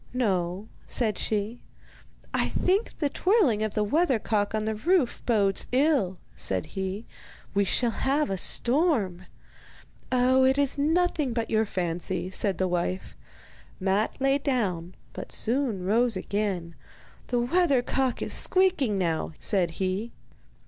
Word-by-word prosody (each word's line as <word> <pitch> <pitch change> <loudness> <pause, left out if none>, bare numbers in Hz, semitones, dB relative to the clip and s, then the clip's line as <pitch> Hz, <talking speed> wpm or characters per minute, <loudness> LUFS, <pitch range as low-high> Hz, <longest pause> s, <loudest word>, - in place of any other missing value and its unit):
'No,' 190 -4 -1 0.2
said 220 -5 -1
she. 215 +2 -2 0.7
'I - - +1
think 390 +5 0
the 295 - +1
twirling 295 - +2
of 215 -1 -2
the 210 - +2
weathercock 220 -6 +1
on 215 0 -1
the 220 - 0
roof 305 - +1
bodes 200 -5 +2
ill,' 255 - +2 0.2
said 95 -1 +1
he; 190 +3 -4 0.5
'we 200 0 +2
shall 235 +5 +1
have 275 0 0
a - - 0
storm.' 235 - +1 0.8
'Oh, 255 +1 +4
it 265 +1 +3
is 285 -2 +1
nothing 310 -3 +1
but 230 -1 -2
your 220 0 +3
fancy,' 180 -1 -3
said 190 -2 0
his 185 - +2
wife. 180 +1 -2 0.6
Matte 195 +5 0
lay 270 +1 +2
down, 190 - -1 0.2
but - - -8
soon 235 -5 -1
rose 230 +4 +2
again. 195 -5 -2 0.5
'The 245 - 0
weathercock 265 -3 +1
is - - -1
squeaking 355 - +2
now,' 165 -3 -1
said 190 -5 +1
he. 190 +5 -2
220 Hz, 135 wpm, -27 LUFS, 190-270 Hz, 0.8 s, Oh